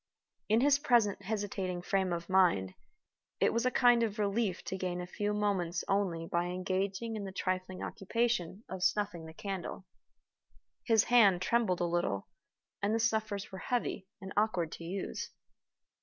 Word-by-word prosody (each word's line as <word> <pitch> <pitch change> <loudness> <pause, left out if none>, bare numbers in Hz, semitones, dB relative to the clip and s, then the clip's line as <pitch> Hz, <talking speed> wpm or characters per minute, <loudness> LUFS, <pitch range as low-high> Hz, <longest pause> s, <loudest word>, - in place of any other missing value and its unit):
In 220 +2 +4
his 285 +1 +5
present 230 -8 +3
hesitating 195 -3 -3
frame 190 -1 +1
of 170 0 -3
mind, 175 - +3 0.7
it - - +3
was 235 +2 +1
a - - +5
kind 245 -1 +5
of 220 -2 -1
relief 205 -2 0
to - - -4
gain 180 -1 -2
a 180 - -4
few 205 +3 -2
moments 195 -5 0
only 185 -5 0
by 170 +1 0
engaging 190 +5 -2
in 210 - -4
the 195 - -5
trifling 185 0 -3
occupation 215 -2 -1
of 185 0 -6
snuffing 180 -4 0
the - - -9
candle. 190 -1 -5 1.0
His 225 -3 +4
hand 210 -7 +5
trembled 200 -2 +1
a - - +2
little, 170 - -1 0.5
and 205 +2 +1
the - - +1
snuffers 220 -3 -1
were 190 - -7
heavy 240 -5 -2
and 190 0 -8
awkward 195 -6 +1
to - - -8
use. 185 +3 -4
195 Hz, 160 wpm, -32 LUFS, 180-220 Hz, 1.0 s, his